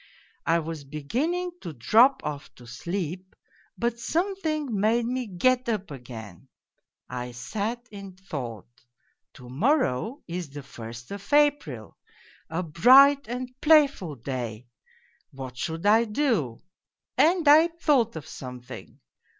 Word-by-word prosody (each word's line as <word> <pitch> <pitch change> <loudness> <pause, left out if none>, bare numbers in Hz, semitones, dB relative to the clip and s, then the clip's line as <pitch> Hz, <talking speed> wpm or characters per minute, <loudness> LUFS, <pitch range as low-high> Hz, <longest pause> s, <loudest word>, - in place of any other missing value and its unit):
I 165 - +4
was 160 -2 -5
beginning 260 - -2
to 165 - -6
drop 225 - +4
off 150 -1 -5
to 120 - -15
sleep, 175 +8 -5 0.4
but 235 0 -1
something 320 -1 -1
made 225 +3 +2
me 250 0 -2
get 245 +6 +1
up 205 -7 -2
again. 115 -8 -10 0.6
I 125 -1 -6
sat 215 - -4
in 200 -2 -9
thought: 135 - -6 0.7
to 125 - -13
morrow 230 - 0
is 175 -2 -5
the 145 0 -9
first 120 -1 -10
of 200 0 -8
April, 285 - +1 0.5
a 165 +3 -2
bright 265 - +6
and 250 +2 -5
playful 285 - +4
day 120 -2 -5 0.6
what 130 -2 -8
should 160 +7 -4
I 220 +3 +5
do? 210 - -1 0.5
And 335 -1 +3
I 310 +3 +8
thought 295 - +1
of 160 - -7
something. 125 -1 -10
190 Hz, 125 wpm, -26 LUFS, -, 0.7 s, I